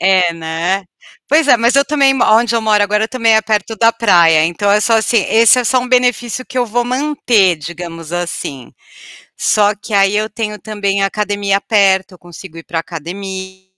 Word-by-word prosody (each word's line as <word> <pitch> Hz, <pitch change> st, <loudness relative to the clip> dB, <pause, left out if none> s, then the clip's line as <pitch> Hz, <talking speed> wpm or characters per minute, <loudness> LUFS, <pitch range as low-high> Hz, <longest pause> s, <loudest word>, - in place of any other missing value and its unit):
É, 185 Hz, -2 st, +2 dB
né? 165 Hz, +4 st, -3 dB, 0.4 s
Pois 305 Hz, +1 st, +3 dB
é, 245 Hz, -, +6 dB
mas 235 Hz, +2 st, +1 dB
eu 280 Hz, -, +4 dB
também 280 Hz, -1 st, +2 dB
m 265 Hz, -, -1 dB
aonde 230 Hz, +1 st, +2 dB
eu 230 Hz, -, +1 dB
moro 210 Hz, -1 st, +2 dB
agora, 210 Hz, +2 st, 0 dB
também, 230 Hz, -3 st, +1 dB
é 220 Hz, -, +4 dB
perto 215 Hz, 0 st, -2 dB
da 230 Hz, +1 st, +3 dB
praia, 170 Hz, -8 st, +3 dB
então 175 Hz, +5 st, -1 dB
é 210 Hz, +1 st, +3 dB
só 230 Hz, -, +1 dB
,assim 220 Hz, -1 st, +1 dB
esse 230 Hz, +2 st, +4 dB
é 250 Hz, -, -1 dB
só 255 Hz, +3 st, +2 dB
um 250 Hz, -, -6 dB
benefício 245 Hz, -1 st, 0 dB
que -, -, -11 dB
eu 245 Hz, -, 0 dB
vou 240 Hz, +2 st, -1 dB
manter, 245 Hz, -, +1 dB
digamos 165 Hz, +1 st, -9 dB
assim, 170 Hz, -7 st, -5 dB, 0.6 s
só 210 Hz, 0 st, +1 dB
que, 210 Hz, +1 st, -8 dB
aí, 195 Hz, +1 st, +2 dB
eu 215 Hz, +1 st, -1 dB
tenho 210 Hz, -1 st, -5 dB
também 200 Hz, -2 st, -2 dB
a -, -, +2 dB
academia 200 Hz, -1 st, -2 dB
perto, 195 Hz, -4 st, +1 dB
eu 180 Hz, -, -16 dB
consigo 175 Hz, 0 st, -13 dB
ir 165 Hz, -, -11 dB
para 165 Hz, -, -4 dB
academia, 190 Hz, +3 st, -8 dB
205 Hz, 200 wpm, -15 LUFS, 185-230 Hz, 0.6 s, é